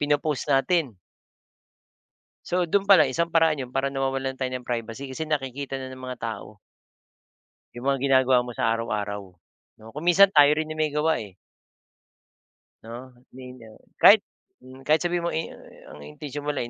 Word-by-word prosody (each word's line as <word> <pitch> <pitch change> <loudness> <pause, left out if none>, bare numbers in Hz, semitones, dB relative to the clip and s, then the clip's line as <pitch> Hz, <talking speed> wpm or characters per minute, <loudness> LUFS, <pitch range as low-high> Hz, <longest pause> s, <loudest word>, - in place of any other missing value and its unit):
Pino-post 145 0 0
natin. 145 0 +1 1.6
So 180 +1 0
dun 195 +4 0
palang 160 -9 +6
isang 170 +5 0
paraan 160 -2 +3
yun 125 -1 -6
para 135 0 0
nawawalan 135 -1 -3
tayo 130 -1 -2
ng 125 -1 -8
privacy 120 +3 -5
kasi 160 +4 -5
nakikita 135 -2 -3
na 130 -1 -7
ng 130 - -11
mga 130 -1 -7
tao 110 -2 -6 1.2
yung 120 +2 -8
mga 135 - +1
ginagawa 130 -2 +3
mo 120 - -7
sa - - 0
araw-araw, 105 -3 -3 0.6
'no? 110 +1 -14
Kung 150 +3 -7
minsan 195 +3 +6
tayo 145 -1 +7
rin 155 0 -2
yung 155 - -10
may 155 - +1
gawa, 150 +2 0
eh. 100 -4 -11 1.5
'No? 120 +3 -10 0.2
Ninyo. 125 -4 -12 0.2
Kahit - - +7 0.4
mhm, 130 +1 -14
kahit 155 +1 +4
sabihin 175 0 -1
mong - - -3
i 160 - -1
i - - -16
ang - - -12
intensyon 145 - -8
mo - - +2
lang 120 - -3
135 Hz, 170 wpm, -24 LUFS, 125-155 Hz, 1.6 s, tayo